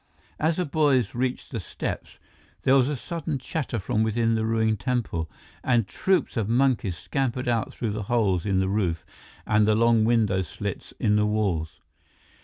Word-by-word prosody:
As 160 +1 +2
the 180 - 0
boys 140 -7 +2
reached 125 +1 -2
the 115 - -3
steps, 90 - -5 0.5
there 130 - +4
was 135 0 +4
a 150 - -1
sudden 160 +1 -4
chatter 130 0 -3
from 105 +1 -1
within 115 +1 +1
the 110 0 0
ruined 110 -2 +1
temple, 115 - -2 0.3
and 120 -5 +2
troupes 190 - 0
of 110 -2 0
monkeys 120 -7 +2
scampered 130 0 -2
out 115 -2 0
through 115 -3 -3
the 105 +1 -3
holes 100 -8 +2
in 95 -2 +1
the 95 - +1
roof 95 -5 -1 0.4
and 105 -1 +3
the 110 - +4
long 115 0 +4
window 110 -5 +2
slits 85 - -6
in 105 0 +3
the 105 0 +2
walls. 95 -7 -1
115 Hz, 175 wpm, -25 LUFS, 105-130 Hz, 0.5 s, there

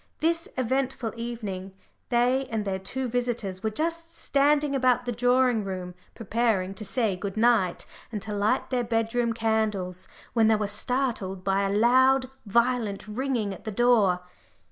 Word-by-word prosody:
This 330 +1 +1
eventful 255 -2 -1
evening 210 -5 -5 0.4
they 250 +2 +2
and 220 -3 -2
their 190 -1 -2
two 255 +7 -3
visitors 235 -6 -2
were 220 - 0
just 330 +7 -3
standing 285 +1 +2
about 250 -2 +2
the 245 - -1
drawing 245 -1 +2
room, 185 -2 -5 0.2
preparing 220 -4 0
to 215 - -7
say 215 -2 0
good 195 +2 -5
night 220 -6 +2 0.3
and 215 - -3
to 210 - -5
light 210 +7 0
their 250 -1 +1
bed 225 -1 -1
room 240 -1 +1
candles, 210 -5 -1 0.3
when 225 -2 +4
they 220 - +5
were 210 0 -1
startled 210 -3 -1
by 195 0 +1
a 200 +1 0
loud 260 +3 +4 0.2
violent 230 -2 +1
ringing 230 -2 -1
at 185 - -11
the 220 - -4
door. 210 -5 +3
230 Hz, 160 wpm, -26 LUFS, 200-250 Hz, 0.4 s, they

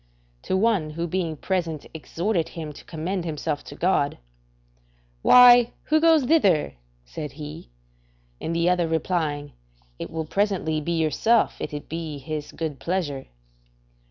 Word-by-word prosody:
To 190 - -1
one 200 -7 +2
who 165 +3 -3
being 170 -2 -2
present 165 -3 -2
exhorted 170 +3 -2
him 155 -3 -7
to - - -12
recommend 175 +3 -3
himself 155 -2 -3
to - - -9
God: 170 -5 +1 1.0
"Why, 245 - +8
who 310 +1 +2
goes 325 -3 +5
thither?" 205 - +3 0.3
said 135 - -7
he; 150 - -9 0.7
and 165 - -2
the 170 +1 +1
other 180 -2 +2
replying: 160 -3 -1 0.5
"It - - -5
will 160 -1 -4
presently 185 -4 0
be 170 +3 -2
yourself, 165 - +2
if - - -4
it 150 -1 -7
be 160 -2 -5
His 150 +2 -6
good 155 -4 -5
pleasure." 165 -7 -2
165 Hz, 140 wpm, -24 LUFS, 155-190 Hz, 1.0 s, Why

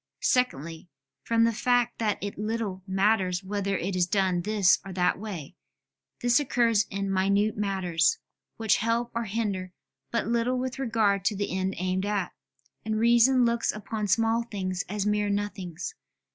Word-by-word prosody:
Secondly, 170 - 0 0.3
from 230 0 +2
the 230 0 +3
fact 245 +1 +1
that 215 -3 0
it 205 0 -5
little 215 -3 -3
matters 190 -1 +1
whether 200 0 -1
it 185 +3 -3
is 180 -1 +2
done 185 -2 +1
this 205 -1 +3
or 195 - -8
that 180 0 +1
way; 185 -7 -7 0.7
this 245 +1 +4
occurs 235 -6 +2
in 195 0 -3
minute 200 +3 +2
matters, 185 -5 +1 0.4
which 220 -2 +2
help 230 +2 0
or 235 0 -2
hinder 200 -4 -3 0.4
but 230 - -1
little 235 +2 0
with 260 +1 -3
regard 220 -6 +1
to 210 - +2
the 200 -2 -2
end 190 0 -1
aimed 185 +2 -1
at; 200 -4 -1 0.5
and 220 0 -1
reason 240 +3 +5
looks 235 0 +1
upon 215 0 -4
small 225 +3 +2
things 190 -5 -3
as 205 0 -2
mere 210 0 +1
nothings. 195 -4 -3
205 Hz, 160 wpm, -27 LUFS, 190-230 Hz, 0.7 s, reason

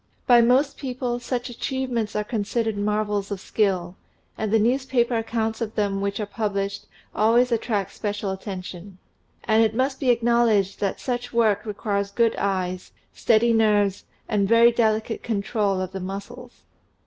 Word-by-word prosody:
By 240 -2 +6
most 260 +4 +3
people, 250 -2 -3
such 245 0 -3
achievements 245 -2 -3
are 210 - 0
considered 220 +1 -2
mar 210 +1 0
vels 205 -1 -2
of 200 -2 -4
skill, 185 -4 -1 0.4
and 215 -2 -3
the 225 - +5
newspaper 245 +1 +1
accounts 225 0 -2
of 220 -1 -3
them 200 -2 0
which 200 +1 -2
are 210 - -1
published 200 -2 -3 0.3
always 235 +4 +3
attract 215 -4 -1
special 205 -1 -3
attention. 190 -1 -7 0.5
And 220 0 +3
it 220 0 0
must 265 +2 0
be 265 - 0
acknowledged 235 -4 +2
that 200 -2 -1
such 245 -1 -3
work 220 -2 +2
requires 200 -1 -2
good 230 +2 +1
eyes, 185 -2 -2 0.2
steady 230 +1 +3
nerves, 210 -3 +2 0.2
and 205 -3 +1
very 230 +1 +6
delicate 220 -1 0
control 205 -2 -1
of 185 0 -3
the 190 - -5
muscles. 200 +7 -8
220 Hz, 155 wpm, -24 LUFS, 200-235 Hz, 0.5 s, By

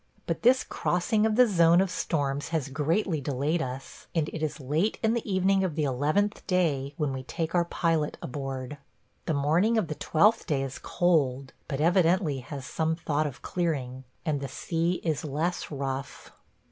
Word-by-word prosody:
But - - -2
this 255 +2 +5
crossing 210 +5 +1
of 215 - 0
the 250 +2 +7
zone 170 -5 +5
of 190 -1 +1
storms 145 -5 -1
has 160 -5 -2
greatly 160 +3 0
delayed 145 +5 0
us, 130 +1 -7
and 160 -2 +1
it 160 - -6
is 155 -1 -2
late 150 +10 0
in 220 0 +3
the 235 -3 -2
evening 190 +1 +3
of 175 -5 -1
the 155 - 0
eleventh 150 +10 +1
day 150 -7 +1
when 145 -3 0
we 130 - -4
take 160 +5 -4
our 175 -1 +3
pilot 165 -3 0
aboard. 135 +1 -5 0.5
The 160 - +1
morning 165 +11 +2
of 200 -7 0
the - - -1
twelfth 205 +9 +2
day 140 -5 +1
is 135 0 -5
cold, 140 -7 +1
but 135 - -3
evidently 170 -2 +3
has 135 +1 -7
some 160 +3 -1
thought 155 -2 -1
of 135 - -9
clearing, 135 -7 -2 0.2
and 150 -4 0
the 140 - -3
sea 165 +6 -1
is 160 -4 -1
less 155 +4 -2
rough. 135 -2 -5
155 Hz, 180 wpm, -28 LUFS, 140-180 Hz, 0.5 s, the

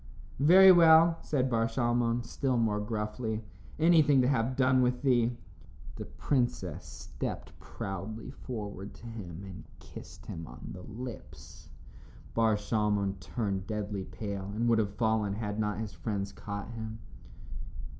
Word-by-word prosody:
"Very 185 +6 +9
well," 165 -1 +7
said 135 -3 0
Bar 115 -2 +1
Shalmon, 120 0 +1
still 130 +1 -1
more 110 -3 +1
gruffly, 110 +1 -3 0.3
"anything 155 -4 +5
to - - +3
have 130 -1 +1
done 130 -1 +4
with 125 +1 +1
thee." 120 -3 +2 0.6
The - - -6
princess 95 - -1
stepped - - -7
proudly 100 +6 -6
forward 105 -7 -7
to - - -14
him 100 -6 -7
and 95 -1 -9
kissed - - -12
him 80 0 -7
on - - -10
the 90 - -9
lips. 105 - -9 0.6
Bar 115 -1 +3
Shalmon 105 -2 0
turned 100 -1 -3
deadly 105 -3 -3
pale 100 -2 -5
and 115 +2 0
would 115 -1 +4
have 100 -2 -1
fallen 110 -3 +1
had 105 -1 -3
not 105 -1 0
his 110 -2 -5
friends 100 -3 -3
caught 100 +2 -6
him. 110 -1 -6
110 Hz, 140 wpm, -30 LUFS, 100-125 Hz, 0.6 s, Very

